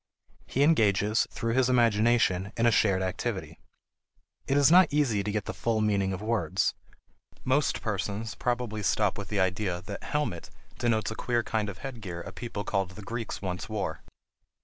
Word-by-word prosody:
He 135 - +1
engages, 110 -7 +3
through 115 0 -2
his 130 0 +3
imagination, 115 -5 +3
in 115 - +2
a 120 - +5
shared 95 -4 +3
activity. 95 -1 -3 0.9
It 135 - +2
is 145 +1 +5
not 180 -1 +7
easy 130 -9 +2
to 105 - -2
get 105 -1 -2
the - - -4
full 115 -2 0
meaning 100 -3 +1
of 95 +2 -4
words. 105 -8 0 0.7
Most 135 +3 +1
persons 105 +1 -2
probably 120 -3 -2
stop 105 0 +1
with 100 -1 -6
the 105 - -1
idea 95 -1 0
that 100 +1 -7
"helmet" 150 - -2 0.3
denotes 110 -2 +1
a - - -5
queer 120 0 0
kind 110 -2 -1
of 95 - -7
headgear 105 -10 -6
a - - -8
people 115 -4 -5
called 100 -4 -1
the 100 +3 -11
Greeks 115 0 -5
once 90 +1 -4
wore. 105 -3 -3
110 Hz, 170 wpm, -28 LUFS, 100-120 Hz, 0.9 s, not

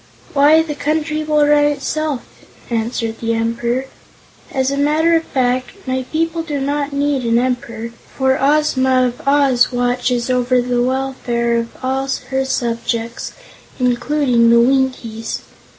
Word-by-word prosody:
"Why, 295 +3 +5
the 315 -2 -4
Country 305 +1 -1
will 300 -1 +3
run 295 0 +4
itself," 295 -1 -1 0.5
answered 225 0 -2
the 230 0 -1
Emperor. 235 +3 -1 0.7
"As 265 0 0
a - - -1
matter 310 +4 +3
of 325 - +2
fact, 255 +1 -1
my 260 0 -2
people 330 +1 0
do 300 -3 -3
not 285 +1 -1
need 280 -1 0
an 230 0 +2
Emperor, 235 -2 -2 0.3
for 265 0 +2
Ozma 265 -3 +3
of 245 0 -4
Oz 275 -4 +3
watches 245 0 0
over 250 0 +2
the 245 0 0
welfare 250 -2 -1
of 230 0 0 0.2
all 265 +1 -1 0.2
her 265 0 0
subjects, 235 -2 -2 0.4
including 250 -1 +2
the 235 0 +6
Winkies. 245 -3 0
260 Hz, 135 wpm, -18 LUFS, 240-290 Hz, 0.7 s, the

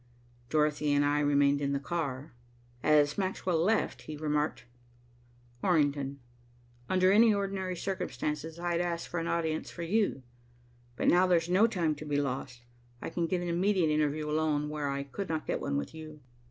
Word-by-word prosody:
Dorothy 150 -1 +1
and 145 0 +3
I 145 +1 +2
remained 145 -1 +3
in 140 0 0
the 140 - 0
car. 145 -2 -4 0.5
As 150 +1 +3
Maxwell 185 -3 -1
left, 220 +4 +1
he 155 - -7
remarked, 150 0 -1 1.0
"Orrington, 145 -5 +1 0.7
under 185 0 +4
any 220 +3 +6
ordinary 195 -2 -2
circumstances, 160 -4 -3
I'd 175 0 -1
ask 170 -1 -2
for 175 - -3
an 165 - -3
audience 160 -2 -1
for 170 - -7
you, 195 -6 0 0.7
but - - -1
now 180 +1 +5
there's 170 -2 +2
no 195 +5 +5
time 175 -8 0
to 155 - -8
be 145 -1 -1
lost. 130 -3 -4 0.4
I - - -6
can 170 0 -1
get 180 +1 -1
an - - -3
immediate 175 -1 +2
interview 150 0 0
alone, 150 -1 0
where 150 -2 -2
I 140 0 -2
could 160 +8 -6
not 160 -1 -2
get - - -2
one 70 - -1
with 70 - -4
you." 155 -1 -10
155 Hz, 170 wpm, -30 LUFS, 145-175 Hz, 1.0 s, any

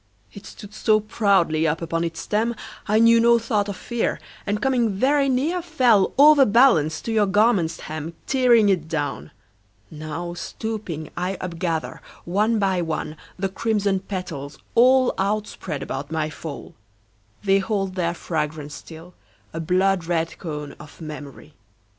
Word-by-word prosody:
It 200 - -11
stood 205 -1 -12
so 215 0 +2
proudly 195 -7 +2
up 160 +1 0
upon 165 0 -2
its 165 -1 -4
stem, 225 +3 -1 0.3
I 215 - +3
knew 230 +1 +6
no 235 0 +5
thought 215 -3 -1
of 200 - -5
fear, 240 -1 -2 0.3
And 205 +1 0
coming 250 -2 +1
very 275 +6 +2
near 300 +8 0
Fell, 255 - +3
overbalanced, 255 - +5
to 230 - -2
your 215 -2 +2
garment's 200 -5 +2
hem, 155 +2 -6
Tearing 245 -5 +4
it 175 -5 +1
down. 145 - -3 0.6
Now, 155 +3 -6
stooping, 185 -5 -5
I 185 +2 -2
upgather, 170 -3 -3 0.3
one 210 +6 +1
by 190 -3 +1
one, 155 -2 -3 0.2
The 190 +1 -1
crimson 200 -1 0
petals, 165 -8 -6 0.2
all 255 +2 +5
Outspread 195 -7 -2
about 140 +3 -5
my 155 -1 -1
fall. 155 -2 -8 0.7
They 195 -1 +3
hold 195 -1 -2
their 170 -2 -1
fragrance 150 -3 -4
still, 165 +3 -11 0.4
a 165 - -4
blood 185 +2 +1
red 165 -1 -2
cone 150 -4 -6
Of 150 - -13
memory. 150 -2 -9
190 Hz, 145 wpm, -23 LUFS, 160-220 Hz, 0.7 s, knew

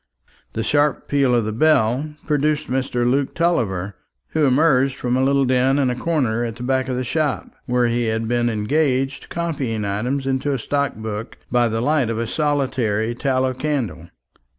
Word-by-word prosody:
The 110 - -2
sharp 145 +2 +1
peal 135 -3 +2
of 115 -3 +1
the 110 - -2
bell 140 +2 +2
produced 150 0 0
Mr. 130 -2 0
Luke 135 +2 0
Tulliver, 100 - 0 0.3
who 155 -2 +2
emerged 135 -1 +3
from 125 -1 -1
a 130 - +2
little 140 0 +3
den 130 +2 +2
in 135 -3 +2
a - - -2
corner 125 -6 0
at 115 -2 -4
the 120 - -8
back 130 +1 0
of 130 - -1
the 130 - -1
shop, 150 +2 -1 0.2
where 125 0 +2
he 120 0 0
had 110 0 -1
been 120 0 +1
engaged 135 +4 0
copying 140 - -2
items 125 +8 -2
into 135 +1 0
a - - 0
stock 140 +3 -1
book 110 +1 -6
by 120 -1 +3
the 115 +1 -1
light 145 -2 +1
of 115 - -2
a 115 - -1
solitary 125 -6 0
tallow 130 +1 0
candle. 125 - -3
130 Hz, 180 wpm, -21 LUFS, 115-140 Hz, 0.3 s, emerged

